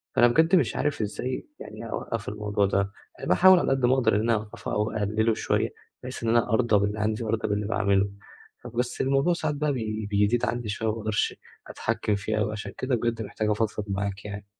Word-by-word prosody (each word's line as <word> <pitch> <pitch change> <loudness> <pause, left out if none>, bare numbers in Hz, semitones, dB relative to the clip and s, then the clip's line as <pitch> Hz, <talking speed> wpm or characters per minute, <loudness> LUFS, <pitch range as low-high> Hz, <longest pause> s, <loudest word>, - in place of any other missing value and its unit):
فأنا 120 - +6
بجد 160 +9 +4
مش 180 - +2
عارف 145 -5 -1
إزاي 115 +5 -3
يعني 115 - -8
أوقّف 115 -1 -4
الموضوع 105 -1 0
ده، 100 0 0 0.4
باحاول 185 0 +7
على - - 0
قد 135 -2 +2
ما 125 - +4
أقدَر 120 -5 +3
إن 105 - +2
أنا 115 +1 +2
أوقّفه 105 0 -5
أو 105 +1 0
أقلّله 110 +2 +1
شوية - - 0 0.3
بحيث 130 -1 -6
إن 115 - +1
أنا 120 0 +3
أرضى 110 -1 +3
باللي 105 +1 -1
عندي 110 +2 0
وأرضى 110 0 -1
باللي 105 0 0
باعمله، 100 -2 +2 0.5
فبس 125 +1 -2
الموضوع 135 +6 +2
ساعات 155 -3 -2
بقى 150 0 0
بي 110 -3 -3
بيزيد 105 +4 +2
عندي 120 -2 -2
شوية، 110 +2 -2
ما - - 0
باقدَرش 110 -1 -1 0.3
أتحكّم 105 - -1
فيه 105 +2 -2
أوي 105 0 0
عشان 105 -2 -5
كده 130 -1 0
بجد 115 -1 -1
محتاج 105 +1 -2
أفضفض 105 0 -1
معاك 100 0 -3
يعني. 100 0 -6
110 Hz, 200 wpm, -26 LUFS, 105-120 Hz, 0.5 s, باحاول